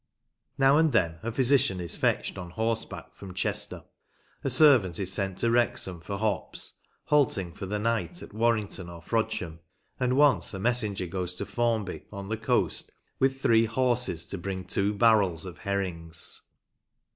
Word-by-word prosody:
Now 135 +1 +5
and 160 -4 +3
then 85 -7 +1
a 115 +2 -3
physician 125 -6 +3
is 85 -2 -5
fetched - - 0
on 90 -2 -7
horseback 115 +4 -3
from 95 -2 -11
Chester; 105 +1 -1 0.6
a - - 0
servant 130 - +5
is 95 -1 -2
sent 95 -1 -2
to 115 - +1
Wrexham 100 -7 +1
for 100 +4 -5
hops, 105 -1 -1 0.2
halting 110 - +1
for 95 - -7
the 105 +2 -2
night 115 +11 -2
at - - -12
Warrington 110 -5 0
or 85 -1 -11
Frodsham; 90 -6 -2 0.4
and 125 +1 +1
once 145 -7 +3
a - - -5
messenger 105 -4 +1
goes 90 0 -4
to - - -3
Formby, 115 -5 -2
on 100 -1 -7
the 110 - -1
coast, 115 - 0 0.3
with 135 0 +1
three 115 0 +5
horses 120 -6 0
to 100 - -4
bring 95 0 -5
two 100 +3 0
barrels 100 -7 +3
of 90 -5 -9
herrings. 85 -5 0
105 Hz, 160 wpm, -27 LUFS, 95-120 Hz, 0.6 s, Now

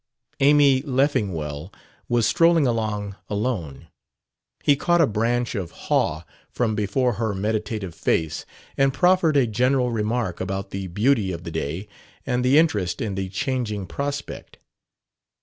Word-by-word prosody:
Amy 140 -1 +5
Leffingwell 100 - -1 0.4
was 120 -2 +2
strolling 165 +1 +4
along 110 -4 -1
alone: 100 - -3 0.8
he 145 - +5
caught 175 +4 +2
a 165 - +6
branch 120 +1 0
of 95 -7 -3
haw 80 -1 -1 0.3
from 115 -3 -1
before 110 +5 0
her 110 -3 0
meditative 105 -2 -2
face 80 -1 -1 0.3
and 135 -1 +2
proffered 180 -4 +3
a 135 - +4
general 125 +3 +1
remark 110 -4 -1
about 95 +1 -4
the 95 -1 -4
beauty 105 +2 +1
of 85 -1 -6
the 85 - -6
day 80 +5 -4 0.4
and 125 -2 0
the 130 +3 +4
interest 105 - +2
in 105 -3 -2
the 95 0 -3
changing 110 -3 -2
prospect. 140 +8 -5
110 Hz, 135 wpm, -23 LUFS, 95-135 Hz, 0.8 s, a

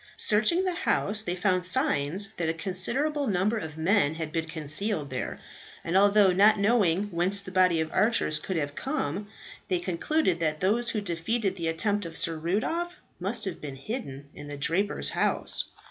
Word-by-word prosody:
Searching 225 - +2
the 365 - 0
house, 215 - 0
they 180 -4 -3
found 185 0 +1
signs 195 - +1
that 165 -2 -1
a 165 - -1
considerable 260 - -1
number 205 +3 +1
of 160 -4 -7
men 160 -2 +2
had 160 -1 -5
been 165 -1 -2
concealed 155 +1 0
there, 125 - -4 0.4
and 165 - -2
although 200 0 +5
not 205 +4 +5
knowing 200 -4 +3
whence 180 +4 +2
the 195 -2 -6
body 185 -3 +3
of 160 0 -2
archers 210 -7 +2
could 185 +3 -4
have 145 -2 -2
come, 170 +8 -3 0.4
they 185 - +1
concluded 180 - 0
that 155 -2 -1
those 225 +7 +2
who 215 - -1
defeated 195 +3 -2
the 170 -3 -3
attempt 205 +3 0
of 165 - -7
Sir 165 -1 0
Rudolph 325 - -1 0.2
must 205 +4 -3
have 185 -4 -5
been 140 -3 -6
hidden 140 - -6
in 145 - -10
the 145 0 -7
draper's 170 +9 0
house. - - +1
185 Hz, 175 wpm, -27 LUFS, 165-210 Hz, 0.4 s, although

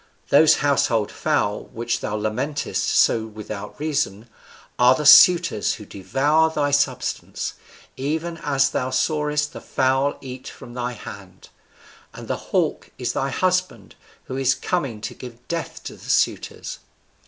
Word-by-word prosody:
Those 150 +2 +6
household 120 -6 +2
fowl, 105 0 -1
which 120 +1 -3
thou 105 - -3
lamentest 125 +8 -2
so 110 -1 +3
without 105 0 -8
reason, 140 -8 -2 0.5
are 125 +1 +6
the 150 - -3
suitors 170 - +7
who 105 - -11
devour 140 +13 +1
thy 145 -2 0
substance, 135 -3 -1 0.4
even 160 +5 -2
as 135 -3 +1
thou 125 - -1
sawest 150 +1 0
the - - -8
fowl 135 +1 +1
eat 130 -1 -9
from 120 - -11
thy 125 0 -3
hand; 100 -4 -11 0.7
and - - -9
the - - -1
hawk - - 0
is - - -2
thy 135 - -1
husband, 185 - -1 0.3
who 130 - -6
is 135 0 +2
coming 135 -12 -2
to - - -5
give 120 -1 -12
death 170 -1 -4
to - - -7
the - - -13
suitors.' - - -1
135 Hz, 140 wpm, -22 LUFS, 115-150 Hz, 0.7 s, suitors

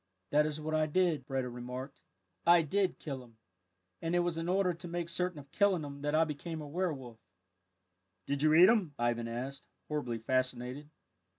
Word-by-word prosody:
"That 150 +1 +4
is 155 0 -3
what 155 +1 -3
I 155 0 +2
did," 155 -4 +1
Breda 135 -2 -1
remarked; 125 +3 -7 0.4
"I 170 0 +6
did 190 +5 +1
kill 135 -4 -5
him, 115 -2 -19 0.6
and 165 +1 0
it 175 - +4
was 175 -1 0
in 165 +1 -2
order 185 -1 +2
to 170 +1 -8
make 170 0 -3
certain 180 0 -1
of 140 -1 -11
killing 195 -3 +3
him 140 -1 -7
that 145 +1 0
I 160 - +5
became 160 +1 -4
a 150 - -6
werwolf." 145 -8 -3 1.1
"Did 140 0 -1
you 155 +1 +5
eat 175 +3 +9
him?" 195 -11 +2
Ivan 120 -1 0
asked, 130 +4 -5 0.2
horribly 145 -6 -2
fascinated. 130 +4 -1
150 Hz, 185 wpm, -32 LUFS, 130-170 Hz, 1.1 s, eat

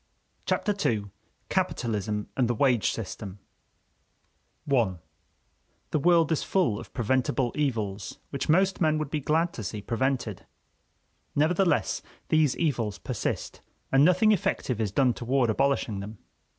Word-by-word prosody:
Chapter 210 - +1 0.2
II: 105 -3 -2 0.4
Capitalism 105 -2 -1
and 125 -3 +2
the 120 - 0
Wage 125 -2 +3
System 100 -2 -6 1.3
I 120 -9 +2 1.0
The 155 - +1
world 170 0 +4
is 160 - +1
full 170 - +1
of - - -11
preventible 125 0 0
evils 110 -9 -2
which 140 0 -3
most 190 +4 +3
men 155 -2 +3
would 155 -2 -3
be 155 - 0
glad 160 +4 +1
to 115 - -6
see 105 +3 -4
prevented. 120 -1 -2 0.9
Nevertheless, 165 +3 +2 0.3
these 155 -4 +3
evils 120 - 0
persist, 85 - -4 0.3
and 135 +1 +5
nothing 185 +6 +5
effective 130 - 0
is 105 -3 -1
done 125 +3 +3
toward 120 0 +1
abolishing 135 -4 0
them. 105 +2 -7
130 Hz, 130 wpm, -27 LUFS, 110-155 Hz, 1.3 s, and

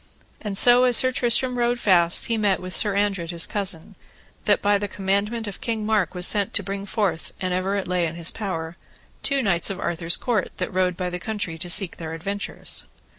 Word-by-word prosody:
And 205 -3 -1
so 245 +3 +6
as 245 -2 +7
Sir 255 - +4
Tristram 250 0 +2
rode 240 0 +1
fast 175 -5 +3
he 230 - 0
met 205 -4 +1
with 185 0 -5
Sir 205 -2 +3
Andred 195 -5 -1
his 170 -1 +4
cousin, 190 -6 -4 0.5
that - - +3
by 205 0 +2
the 205 - -3
commandment 200 +4 -2
of 205 -3 -8
King 225 -2 -2
Mark 210 -5 0
was 180 0 +4
sent 205 0 +3
to - - 0
bring 200 0 -5
forth, 195 -7 -2
an 185 -1 -2
ever 185 +2 -1
it 200 - -3
lay 180 -1 0
in 160 - -7
his 170 0 -4
power, 170 -5 -5 0.4
two 275 -2 +1
knights 175 -5 0
of 195 - -5
Arthur's 170 0 -1
court, 225 -6 -1
that - - -4
rode 180 -1 0
by 180 -1 -3
the 180 - -4
country 205 -4 -3
to 175 +1 -3
seek 180 0 +3
their 160 -1 -6
adventures. 200 +4 -3
195 Hz, 215 wpm, -23 LUFS, 180-215 Hz, 0.5 s, as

